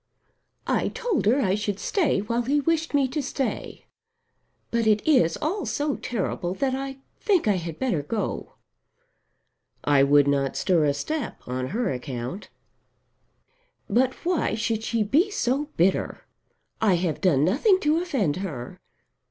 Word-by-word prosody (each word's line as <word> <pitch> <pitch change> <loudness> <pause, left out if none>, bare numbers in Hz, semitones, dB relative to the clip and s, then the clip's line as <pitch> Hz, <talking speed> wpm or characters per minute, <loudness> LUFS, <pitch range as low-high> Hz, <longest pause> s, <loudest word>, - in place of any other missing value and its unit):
"I - - +1
told 460 - -1
her 250 +6 +4
I 190 -6 +2
should 205 -1 -1
stay 325 - +1
while 230 +3 -1
he 275 +5 +1
wished 325 +1 0
me 275 -2 +3
to 300 +3 -2
stay. 270 -1 -4 0.9
But 230 -1 +1
it 215 +3 +2
is 170 - +4
all 380 +7 -2
so 290 -1 -1
terrible, 190 -5 -3
that 265 +5 0
I 270 0 -4 0.2
think 385 - +2
I 205 -3 +3
had 165 -2 -5
better 240 - 0
go." 210 +9 -4 1.3
"I 145 -2 +4
would 145 +1 +5
not 140 -1 +1
stir 170 -5 +2
a 140 -1 +1
step 300 - -4
on 130 +1 -2
her 225 - -1
account." 125 - -6 1.4
"But 260 +2 +2
why 345 -10 +1
should 220 0 -1
she 225 0 0
be 305 - +2
so 285 - 0
bitter? 180 +3 +1 0.6
I 205 -4 +4
have 170 -2 -1
done 155 -7 +3
nothing 335 - +3
to 310 +2 +2
offend 220 - 0
her. 150 -11 -6
220 Hz, 150 wpm, -25 LUFS, 170-285 Hz, 1.4 s, would